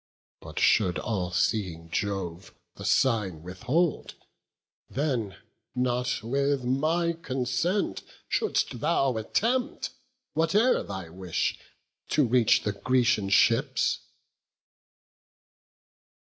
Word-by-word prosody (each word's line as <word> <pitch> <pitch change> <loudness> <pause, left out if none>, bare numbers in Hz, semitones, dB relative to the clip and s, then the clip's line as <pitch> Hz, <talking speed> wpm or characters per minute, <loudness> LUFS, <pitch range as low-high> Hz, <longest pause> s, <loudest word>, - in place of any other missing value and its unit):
But - - -11
should 90 -5 +3
all 95 -6 -2
seeing 90 -3 -1
Jove 95 -2 -3 0.2
the - - -9
sign 105 -11 +1
withhold, 130 - -1 0.7
Then 125 -8 -2 0.4
not 125 -2 0
with 140 +3 0
my 160 +7 +1
consent 135 - -1 0.3
shouldst 275 - 0
thou 135 -4 +1
attempt, 235 - -1 0.4
Whate'er 200 +11 +3
thy 95 -4 -6
wish, 90 0 -2 0.5
to 150 - +3
reach 120 -1 +4
the 105 - 0
Grecian 120 -1 +1
ships." 100 - +3
125 Hz, 90 wpm, -27 LUFS, 95-145 Hz, 0.7 s, reach